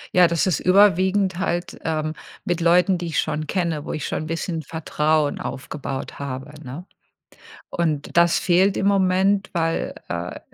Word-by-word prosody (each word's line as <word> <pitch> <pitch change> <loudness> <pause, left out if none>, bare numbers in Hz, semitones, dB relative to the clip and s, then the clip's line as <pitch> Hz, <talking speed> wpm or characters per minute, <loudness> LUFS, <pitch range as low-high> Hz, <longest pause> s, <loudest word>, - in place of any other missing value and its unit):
Ja, 180 -1 +7
das 170 -1 +1
ist 185 -5 +1
überwiegend 190 0 +3
halt, 175 -2 -2
ähm, 155 -1 -1 0.3
mit 175 -1 -1
Leuten, 180 +2 +4
die 175 - -4
ich 160 - -1
schon 155 0 -2
kenne, 170 -4 -1
wo - - -5
ich 155 - -3
schon 155 - -3
'n - - -7
bisschen 165 0 -3
Vertrauen 155 -1 0
aufgebaut 135 +2 -6
habe, 135 0 -5
ne? 140 +7 -8 0.8
Und 160 -2 -2
das 170 0 +5
fehlt 190 +2 +3
im 195 - +1
Moment, 195 0 +2
weil, 165 -1 -1 0.2
äh, 85 +1 -4
170 Hz, 160 wpm, -22 LUFS, 150-185 Hz, 0.8 s, Ja